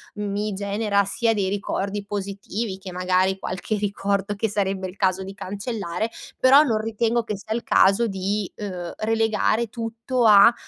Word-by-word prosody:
mi 205 0 -2
genera 200 0 0
sia 225 +3 +1
dei 195 -3 0
ricordi 200 0 -2
positivi 200 +1 -4
che, 190 -1 -9
magari, 185 +1 +1
qualche 190 +4 -3
ricordo 200 0 -1
che 215 +3 0
sarebbe 195 -2 -1
il 185 - -10
caso 190 -1 +1
di 195 +1 -7
cancellare. 205 0 -4 0.3
Però 270 +3 +7
non 230 -8 +1
ritengo 225 +2 0
che 215 - -3
sia 220 +2 -5
il 235 - -2
caso 195 +5 +4
di, 195 0 -2
uhm, 180 -4 -5
relegare 225 +1 +1
tutto 230 +2 -2
a, 210 +2 +8
205 Hz, 155 wpm, -23 LUFS, 195-220 Hz, 0.3 s, a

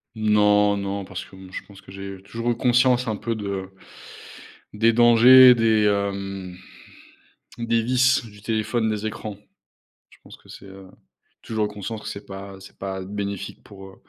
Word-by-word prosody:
Non 105 -1 +3
non, 100 0 -4
parce 95 -1 -7
que, - - -17
mmh, 95 -1 -13
je - - -6
pense 100 -1 -16
que - - -15
j'ai 95 0 -8
toujours 115 +4 -4
eu - - -1
conscience 125 0 +2
un 110 - -1
peu 115 +1 -3
de 100 -3 -5 1.0
des 115 +2 +3
dangers 120 +2 +8
des, 110 -2 +2
hem, 100 -2 -2 1.0
des 115 -1 0
vices 130 +1 +2
du 105 -2 -15
téléphone, 110 +1 -1
des 105 0 -3
écrans. 110 -1 -6 0.7
Je - - -20
pense - - -14
que - - -23
c'est, - - -12
heu, 95 0 -13 0.6
toujours 110 -2 -2
eu - - -4
conscience 105 +1 -7
que - - -9
c'est 100 +1 -8
pas 95 0 -9
c'est 95 - -15
pas 95 -1 -5
bénéfique 100 0 -6
pour, 95 -1 -13
heu, 95 - -15
105 Hz, 175 wpm, -23 LUFS, 100-115 Hz, 1.0 s, dangers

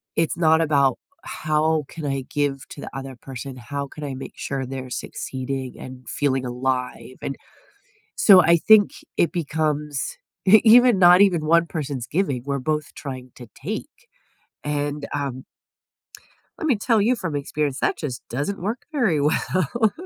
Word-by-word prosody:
It's 165 0 0
not 160 -1 +4
about, 140 -4 +3 0.3
"How 155 0 0
can 160 -2 -7
I 135 -1 -1
give 145 -2 -1
to 140 - -9
the - - -6
other 135 -1 -7
person? 130 +1 -8
How 140 +3 -5
can 150 +2 -10
I 140 - -4
make 135 - -8
sure 135 -1 -3
they're 130 0 -6
succeeding 130 +1 -5
and 130 -1 -10
feeling 135 -3 0
alive?" 125 +1 -3
And, 135 - -4 0.8
so 190 -3 +8
I 170 +1 +5
think 210 +4 +6 0.3
it 170 - +3
becomes 150 - -2 0.3
e 215 +3 +9
even 240 0 +7
not 180 +1 +8
even 175 -6 +3
one 170 +1 +4
person's 140 -6 -4
giving, 150 -7 -1
we're 140 0 -2
both 150 +2 -2
trying 130 -3 -7
to 120 - -11
take, 255 - -6 0.6
and, 145 0 -2
um 135 -2 -3 1.2
let - - -3
me 265 -8 +3
tell 225 +1 +2
you 240 +5 +2
from 165 -8 -3
experience, 145 0 -2
that - - +1
just 130 -4 -5
doesn't 145 +11 -3
work 215 +7 -4
very 215 - +2
well. 185 +8 +1
150 Hz, 160 wpm, -23 LUFS, 135-175 Hz, 1.2 s, e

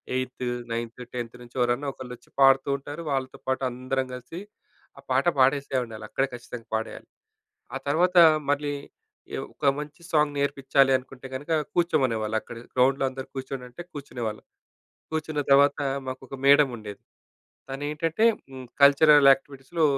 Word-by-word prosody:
Eighth, 130 0 -3 0.3
ninth, 115 +1 -4
10థ్ 120 -1 -5
నుంచి 120 0 -15
ఎవరన్నా 120 +3 +1
ఒకళ్ళొచ్చి 125 -2 -10
పాడుతూ 135 0 +5
ఉంటారు. 145 +4 -8
వాళ్ళతో 130 -1 -2
పాటు 130 0 0
అందరం 130 +2 -2
కలిసి, 125 +7 -8 0.6
ఆ 140 - -12
పాట 130 +2 +2
పాడేసే 135 0 +3
ఉండాలి. 110 -1 -10
అక్కడే 135 - 0
ఖచ్చితంగా 120 -1 -9
పాడేయాలి. 110 0 -5 0.7
ఆ - - 0
తర్వాత 180 +5 +2 0.3
మళ్ళీ 145 0 0 0.6
ఎ - - -3 0.2
ఒక 140 - +2
మంచి 150 +2 -8
సాంగ్ 150 -2 +2
నేర్పిచ్చాలి 140 -1 +2
అనుకుంటే 130 +1 -11
గనక, 145 +5 -6 0.2
కూర్చోమనేవాళ్ళక్కడ. 120 -10 0 0.2
గ్రౌండ్‌లో 135 +2 +3
అందరూ 130 0 -8
కూర్చోండంటే, 130 +1 -6
కూర్చునేవాళ్ళం. 120 -7 -5 0.7
కూర్చున్న 155 -1 -2
తర్వాత 140 +1 +5 0.3
మాకొక 130 +1 -7
మేడమ్ 140 -1 +6
ఉండేది. 105 -2 -9 0.7
తనేంటంటే, 150 +8 -1 0.3
హ్మ్, 130 -1 -9 0.2
కల్చరల్ 145 0 +7
యాక్టివిటీస్‌లో 135 +4 -2
135 Hz, 130 wpm, -26 LUFS, 125-145 Hz, 0.7 s, కల్చరల్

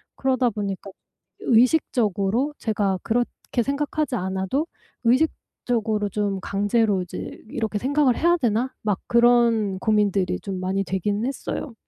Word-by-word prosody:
그러다 260 -2 +1
보니까 200 -2 -4 0.5
의식적으로 240 - +2
제가 205 -4 0
그렇게 240 +1 -1
생각하지 290 +1 -1
않아도 190 - -1 0.4
'의식적으로 230 -5 0
좀 200 -1 -1
강제로 205 0 +1
이제 180 - -7
이렇게 220 -2 -2
생각을 275 +1 +2
해야 345 +2 +4
되나?' 245 -2 0
막 205 -3 0
그런 235 -5 +3
고민들이 200 -4 +1
좀 195 -2 -4
많이 190 +2 -1
되긴 200 +3 -1
했어요. 270 0 -4
220 Hz, 300 characters per minute, -23 LUFS, 200-250 Hz, 0.5 s, 해야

